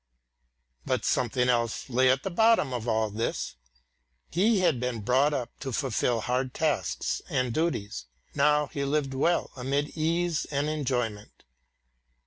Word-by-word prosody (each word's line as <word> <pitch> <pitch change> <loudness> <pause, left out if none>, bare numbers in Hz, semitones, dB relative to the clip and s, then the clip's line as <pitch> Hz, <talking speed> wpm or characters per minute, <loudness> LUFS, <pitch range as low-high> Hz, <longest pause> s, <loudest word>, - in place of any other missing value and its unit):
But - - -1
something 125 0 +1
else 120 -2 0
lay 130 0 +3
at 130 +1 +2
the 195 - -3
bottom 220 - +3
of 120 -1 -4
all 110 -2 +1
this. 115 +3 -2 0.8
He 200 +4 +3
had 165 -9 +2
been 125 -2 -2
brought 130 +7 +3
up 125 -5 -3
to 135 - -4
fulfil 120 -3 0
hard 125 +2 -1
tasks 150 - -1
and 125 -2 0
duties. 115 - -2 0.3
Now 150 +1 +3
he 140 0 -4
lived 140 -1 0
well 170 +6 +1
amid 140 +3 -1
ease 165 +1 0
and 145 0 -1
enjoyment. 125 -8 -3
135 Hz, 140 wpm, -28 LUFS, 120-150 Hz, 0.8 s, lay